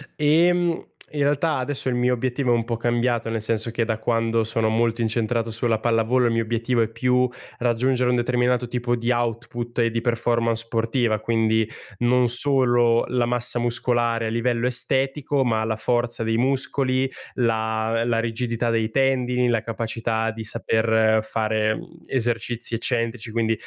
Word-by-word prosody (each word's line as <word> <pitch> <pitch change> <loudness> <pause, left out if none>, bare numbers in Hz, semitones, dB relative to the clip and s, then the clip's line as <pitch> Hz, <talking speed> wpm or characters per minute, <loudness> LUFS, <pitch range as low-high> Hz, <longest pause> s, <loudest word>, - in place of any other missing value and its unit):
Ehm, 170 +3 +2 0.3
in 150 - -3
realtà 145 +2 +1
adesso 135 +1 -3
il 125 - -1
mio 125 +1 +2
obiettivo 125 +1 -1
è - - +5
un 115 -1 -1
po' 115 0 -2
cambiato, 120 0 0
nel 115 0 -1
senso 110 +1 -1
che 115 0 -1
da 110 -1 -2
quando 115 0 +1
sono 110 0 0
molto 115 +1 +1
incentrato 115 0 0
sulla 115 0 0
pallavolo, 115 +2 +2
il 115 - +2
mio 115 - +1
obiettivo 115 +2 0
è 115 - +2
più 125 +2 +1 0.3
raggiungere 125 +1 +1
un 125 - +3
determinato 125 0 +1
tipo 120 0 -1
di 120 +1 -1
output 120 0 -3
e 115 -1 +2
di 115 0 -1
performance 115 -1 0
sportiva, 115 -1 0
quindi 110 0 +1 0.3
non 125 +1 +3
solo 120 -2 +3
la 125 -1 +1
massa 120 0 -2
muscolare 120 -1 0
a - - -1
livello 115 +1 0
estetico 135 +2 0
ma 110 -2 +1
la 110 -1 -2
forza 120 0 -1
dei 115 0 0
muscoli 130 +1 0 0.3
la 110 -1 0
la 115 -1 +1
rigidità 115 +1 -1
dei 115 -1 +1
tendini, 125 -1 +1
la 115 -2 +1
capacità 115 0 -2
di 110 +1 -7
saper 110 0 +2
fare 110 0 0 0.3
esercizi 120 -2 -2
eccentrici, 115 0 -2
quindi, 115 0 +1
120 Hz, 160 wpm, -23 LUFS, 115-125 Hz, 0.3 s, è